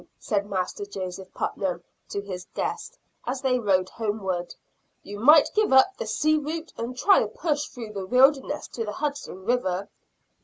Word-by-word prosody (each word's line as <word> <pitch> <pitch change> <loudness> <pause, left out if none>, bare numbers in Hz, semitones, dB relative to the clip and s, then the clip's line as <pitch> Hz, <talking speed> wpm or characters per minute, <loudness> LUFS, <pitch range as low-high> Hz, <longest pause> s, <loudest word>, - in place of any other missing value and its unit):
said 205 -1 -1
Master 190 +1 -2
Joseph 190 -2 -6
Putnam 180 -3 -2 0.3
to 200 - -3
his 185 -3 -7
guest, - - -3 0.3
as 255 +1 -2
they 255 -2 +2
rode 190 -4 +2
homeward. 195 -5 -3 0.5
"You 205 +1 -8
might 295 +6 +7
give 430 0 +2
up 265 +9 +6
the - - -5
sea 310 +1 +2
route 320 +3 -5
and 240 +2 -5
try 390 +9 +6
a - - 0
push 300 -3 -1
through 225 -4 -8
the 195 -2 -5
wilderness 270 +5 +3
to 230 - -4
the 210 -1 -4
Hudson 280 -9 -4
River." 200 -5 0
225 Hz, 165 wpm, -26 LUFS, 195-285 Hz, 0.5 s, might